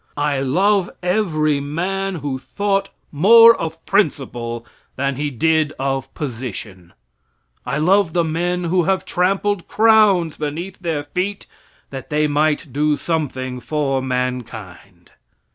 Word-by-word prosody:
I 145 -1 0
love 185 +8 +2
every 160 -6 +1
man 185 +7 -2
who 140 -4 -4
thought 195 +5 -1 0.2
more 230 +9 +7
of 165 0 -6
principle 120 - -1 0.3
than 140 0 -1
he 145 +2 -2
did 155 +3 +1
of 135 0 -2
position. 110 - -6 0.7
I 130 +3 -1
love 180 +2 +3
the 175 - +2
men 175 +3 -1
who 175 0 +1
have 190 0 0
trampled 195 +1 0
crowns 210 -7 +4
beneath 160 +5 -5
their 165 -5 -2
feet 185 +7 -3 0.5
that 135 -1 -8
they 150 0 +1
might 150 -1 0
do 150 +1 +1
something 130 -6 -3
for 135 -1 -1
mankind. 115 -8 -5
155 Hz, 125 wpm, -20 LUFS, 135-185 Hz, 0.7 s, more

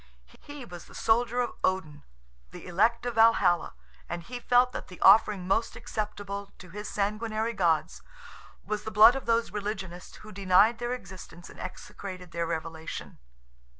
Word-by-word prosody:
He 290 -3 -10
was 175 -4 -10
the - - -16
soldier 240 +2 +2
of 240 - -2
Odin, 160 -6 -1 0.5
the - - -11
elect 225 +7 +1
of 245 - -2
Valhalla; 225 - +3 0.3
and 170 - -4
he 245 +6 -7
felt 245 +1 +3
that - - -7
the 180 - -12
offering 195 -2 +5
most 225 +4 0
acceptable 200 -2 -5
to 180 -2 -13
his 210 +3 -6
sanguinary 215 +2 -2
gods 170 -6 0 0.6
was 215 -1 -2
the - - -4
blood 215 +3 +7
of 270 - -6
those 230 -3 +1
religionists 195 -4 -5
who 215 - -10
denied 200 +4 +3
their 240 0 -2
existence 185 -6 -10
and - - -15
execrated 185 -1 -8
their 170 0 -2
revelation. 160 -1 -6
205 Hz, 155 wpm, -28 LUFS, 180-230 Hz, 0.6 s, blood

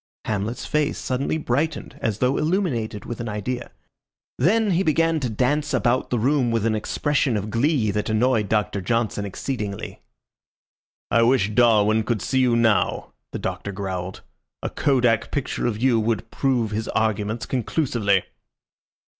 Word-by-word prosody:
Hamlet's 110 +2 -2
face 150 -1 0
suddenly 135 +4 -1
brightened 150 +2 -2
as 110 -3 -1
though 125 +3 +1
illuminated 150 - -1
with 120 - -6
an 120 -1 -4
idea. 120 +4 -4 0.7
Then 210 - +3
he 175 +1 +2
began 165 -1 +2
to 130 -4 -2
dance 135 +6 0
about 120 +2 +1
the 125 - 0
room 130 +2 +2
with 115 -2 0
an 115 - +2
expression 130 +3 0
of 105 +1 -4
glee 120 -2 +2
that 105 +2 -2
annoyed 110 -1 +2
Doctor 105 -2 0
Johnson 110 0 -1
exceedingly. 100 0 -5 1.1
"I 115 - +4
wish 115 -3 +3
Darwin 110 -2 +4
could 110 -3 -2
see 130 - +1
you 125 -2 +3
now," 115 -3 +1 0.2
the - - -4
Doctor 100 - -4
growled. 95 -2 -5 0.4
"A - - -2
kodak 125 -5 +2
picture 140 -3 -2
of 110 -3 -2
you 120 -2 +3
would 110 0 -1
prove 125 -5 0
his 110 +1 -2
arguments 110 0 -1
conclusively." 120 - 0
115 Hz, 150 wpm, -23 LUFS, 105-135 Hz, 1.1 s, I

